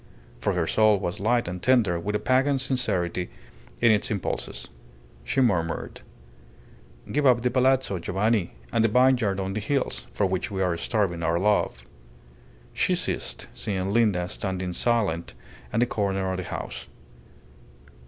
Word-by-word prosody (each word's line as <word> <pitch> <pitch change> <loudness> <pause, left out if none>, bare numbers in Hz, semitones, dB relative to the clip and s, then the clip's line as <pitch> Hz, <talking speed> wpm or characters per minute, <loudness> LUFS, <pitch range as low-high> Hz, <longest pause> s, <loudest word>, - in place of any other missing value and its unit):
For 95 - 0
her 90 -2 0
soul 110 +4 +4
was 90 -2 -3
light 120 +2 +1
and 90 0 -5
tender 110 -9 +3
with 105 +5 -3
a - - +1
pagan 135 +2 +2
sincerity 105 - -1 0.5
in 115 -1 +6
its 105 -2 +2
impulses. 75 - -3 0.6
She 135 - 0
murmured 90 -9 0 1.1
"Give 150 - +1
up 120 -2 +4
the 125 - +1
palazzo, 130 -6 +2
Giovanni, 95 - 0 0.2
and 110 - +3
the - - +5
vineyard 120 -4 +3
on 95 0 -2
the 110 - -2
hills, 135 +6 -1
for 100 - 0
which 95 -1 -1
we 95 -1 -1
are 90 -2 +1
starving 90 -2 -1
our 85 0 +1
love." 95 -10 +1 0.9
She - - +1
ceased, - - -3
seeing 95 -2 -2
Linda 100 -6 +2
standing 95 -1 -3
silent 95 - 0 0.4
at - - +1
the - - +5
corner 95 -4 -1
of 95 - -2
the 95 - -3
house. - - -6
100 Hz, 155 wpm, -26 LUFS, 90-120 Hz, 1.1 s, in